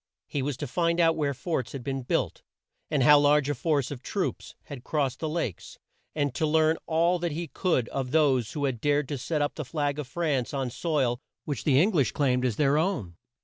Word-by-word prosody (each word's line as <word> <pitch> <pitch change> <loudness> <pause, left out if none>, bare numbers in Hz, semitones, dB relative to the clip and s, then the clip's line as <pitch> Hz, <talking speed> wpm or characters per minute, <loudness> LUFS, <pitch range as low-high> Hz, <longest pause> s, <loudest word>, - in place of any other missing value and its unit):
He 145 - -3
was 135 -1 -2
to 145 - -4
find 170 +5 0
out 165 -1 +4
where 145 -3 -1
forts 130 -6 -3
had 135 -3 -6
been 135 +1 -3
built, 125 - -1 0.5
and 145 -4 +1
how 150 +3 +8
large 145 0 +3
a - - 0
force 145 -1 0
of 130 -4 -6
troops 195 +5 -3
had 140 -5 -9
crossed 135 -4 -1
the 160 - -2
Lakes, 155 - -4 0.4
and 145 -4 0
to 155 - 0
learn 160 +1 +3
all 170 +2 +2
that 170 -2 -2
he 170 +2 -4
could 135 -4 0
of 135 -2 -3
those 135 -6 +2
who 145 -2 -1
had 125 -5 -2
dared 145 -1 +1
to 145 -3 -3
set 150 +3 -1
up 145 - -1
the 155 - -5
flag 145 0 -2
of 145 - -4
France 140 -3 -1
on 135 -3 -2
soil 130 -3 0 0.3
which 145 - -4
the 135 -3 +4
Eng 195 +8 +4
lish 140 - +1
claimed 130 -3 +1
as 120 -4 0
their 145 +2 +3
own. 155 - -1
145 Hz, 225 wpm, -27 LUFS, 130-160 Hz, 0.5 s, how